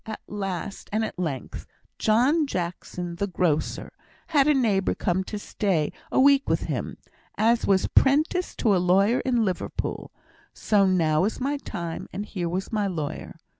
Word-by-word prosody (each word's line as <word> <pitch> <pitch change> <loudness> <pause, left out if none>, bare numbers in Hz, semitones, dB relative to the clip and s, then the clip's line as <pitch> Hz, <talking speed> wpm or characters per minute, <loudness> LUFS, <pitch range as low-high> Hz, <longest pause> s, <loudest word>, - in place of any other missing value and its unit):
At 220 - -5
last 195 -2 -5
and 220 +1 +1
at 185 - -7
length, 145 -8 -4 0.3
John 265 +8 +3
Jackson, 175 -3 -4
the 200 - -1
grocer, 170 -5 -1 0.4
had 290 -3 +4
a 300 - +4
nephew 210 -7 +1
come 185 0 0
to 210 - -5
stay 190 -6 -1 0.2
a - - +2
week 275 +1 +5
with - - +1
him, - - -4 0.4
as 230 +2 +2
was 190 -1 +3
'prentice 310 +6 +2
to 215 -5 +2
a 180 - +2
lawyer 195 +7 +3
in 240 -4 +1
Liverpool; 185 -2 -3 0.5
so 200 -3 +3
now 160 -4 +2
was 210 +4 -1
my 280 +3 -1
time, 170 -11 -6
and 205 - -4
here 180 -5 -3
was 185 +3 -3
my 210 -2 +1
lawyer. 160 -5 -5
200 Hz, 165 wpm, -25 LUFS, 180-240 Hz, 0.5 s, week